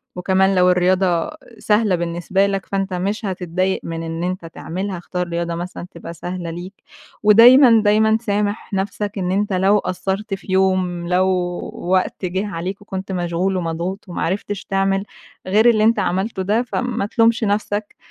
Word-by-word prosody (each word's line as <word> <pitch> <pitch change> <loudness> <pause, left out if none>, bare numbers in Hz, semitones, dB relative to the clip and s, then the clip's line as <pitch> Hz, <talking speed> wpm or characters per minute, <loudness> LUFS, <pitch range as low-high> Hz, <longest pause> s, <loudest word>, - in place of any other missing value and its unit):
وكمان 190 +1 +2
لو 180 0 +4
الرياضة 180 - +2 0.3
سهلة 210 -3 +2
بالنسبة 175 +3 0
لك، 195 -1 -2
فأنتَ 195 -1 -2
مش 200 +5 -2
هتتضايَق 185 0 -1
من 165 0 -5
إن 165 +1 -4
أنتَ 180 -1 -3
تعملها. 185 +3 -5
اختار 180 0 -3
رياضة 170 0 -2
مثلًا 175 +1 -6
تبقى 170 0 -9
سهلة 175 +1 -5
ليك. 175 +4 -7 0.5
ودايمًا، 230 +2 +7
دايمًا 220 +1 +4
سامح 205 0 -2
نفسك. 200 +1 -3
إن 180 -1 -1
أنتَ 205 +1 0
لو 190 +3 +3
قصّرت 195 +3 -3
في 195 0 -6
يوم، 185 -2 +1
لو 180 +1 +2 0.5
وقت 185 +1 -1
جه 190 +3 -2
عليك 190 +2 -5
وكنت 190 -1 -6
مشغول 180 +1 -1
ومضغوط، 175 +4 -3
وما 175 - -5
عرفتش 200 +2 -3
تعمل 195 0 0 0.4
غير 215 +5 +5
اللي 215 -2 +3
أنتَ 225 -1 +3
عملته 190 +2 -1
ده، 215 +5 +1
فما 245 -3 -2
تلومش 230 +1 +2
نفسك. 205 0 -1
190 Hz, 155 wpm, -20 LUFS, 180-205 Hz, 0.5 s, ودايمًا